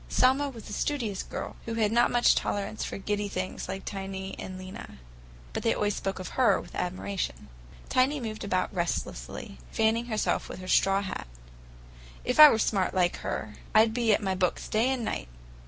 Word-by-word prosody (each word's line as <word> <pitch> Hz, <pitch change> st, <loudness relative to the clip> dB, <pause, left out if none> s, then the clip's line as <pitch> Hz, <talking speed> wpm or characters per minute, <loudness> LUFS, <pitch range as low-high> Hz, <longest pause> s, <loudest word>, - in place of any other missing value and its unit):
Selma 270 Hz, +3 st, +3 dB
was 230 Hz, -5 st, -10 dB
a 205 Hz, -, -7 dB
studious 225 Hz, -7 st, -1 dB
girl, -, -, -6 dB
who 230 Hz, -, -3 dB
had 215 Hz, -2 st, +2 dB
not 240 Hz, +1 st, +4 dB
much 240 Hz, 0 st, +5 dB
tolerance 205 Hz, +1 st, -2 dB
for -, -, -4 dB
giddy 205 Hz, +1 st, -2 dB
things 185 Hz, -1 st, -4 dB
like 190 Hz, +1 st, -5 dB
Tiny 195 Hz, -1 st, -5 dB
and 185 Hz, -1 st, -6 dB
Lena; 185 Hz, -, -9 dB, 0.6 s
but -, -, -2 dB
they 225 Hz, -, +2 dB
always 205 Hz, -1 st, 0 dB
spoke 195 Hz, -, -3 dB
of 185 Hz, -, -6 dB
her 255 Hz, -2 st, +3 dB
with -, -, -11 dB
admiration. 185 Hz, -, -3 dB, 0.4 s
Tiny 270 Hz, +3 st, +2 dB
moved 220 Hz, -3 st, -5 dB
about 185 Hz, -1 st, 0 dB
restlessly, 65 Hz, -, -3 dB
fanning 225 Hz, +2 st, +2 dB
herself 215 Hz, -3 st, 0 dB
with -, -, -6 dB
her 185 Hz, 0 st, -8 dB
straw 195 Hz, +1 st, +3 dB
hat. 190 Hz, -, -5 dB, 1.0 s
"If 250 Hz, +4 st, 0 dB
I 305 Hz, -1 st, +13 dB
was 225 Hz, -5 st, +2 dB
smart 190 Hz, -4 st, 0 dB
like 175 Hz, -1 st, +2 dB
her, 105 Hz, 0 st, -4 dB, 0.2 s
I'd 220 Hz, +1 st, +6 dB
be 235 Hz, -1 st, +2 dB
at 210 Hz, -, +2 dB
my 190 Hz, -1 st, +1 dB
books 185 Hz, -1 st, 0 dB
day 225 Hz, +4 st, +2 dB
and 260 Hz, -4 st, -1 dB
night. -, -, -3 dB
205 Hz, 190 wpm, -28 LUFS, 185-230 Hz, 1.0 s, I